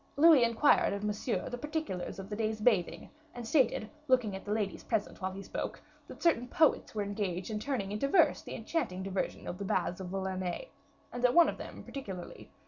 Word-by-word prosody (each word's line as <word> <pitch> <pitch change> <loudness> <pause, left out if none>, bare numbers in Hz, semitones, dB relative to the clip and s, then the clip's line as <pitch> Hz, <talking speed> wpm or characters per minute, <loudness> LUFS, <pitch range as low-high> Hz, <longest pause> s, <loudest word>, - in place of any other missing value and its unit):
Louis 305 -4 +8
inquired 235 +2 +4
of 200 0 -4
Monsieur 210 +3 -1
the 245 - -5
particulars 295 - -3
of 195 -1 -7
the 210 - -4
day's 220 0 -1
bathing; 210 -6 +1 0.2
and 240 -2 -6
stated, 245 -5 +2 0.2
looking 250 -7 +3
at 190 - -7
the 205 - -5
ladies 210 -2 -1
present 215 -3 -2
while 190 - -1
he 195 +1 -7
spoke, - - -4 0.3
that - - -10
certain 280 -8 +3
poets 310 -3 +2
were 210 - 0
engaged 200 0 -3
turning 240 -8 -2
into 210 +6 0
verse 330 - +4
the - - -7
enchanting 215 - -2
diversion 195 0 -3
of 180 - -5
the - - -3
baths 180 -1 0
of 190 - -5
Vulaines, 190 - -3 0.5
and 245 0 -5
that 250 -1 +4
one 340 -1 +7
of - - -5
them - - -8
particularly, 190 -10 -7
M. - - -33
215 Hz, 205 wpm, -32 LUFS, 195-250 Hz, 0.5 s, Louis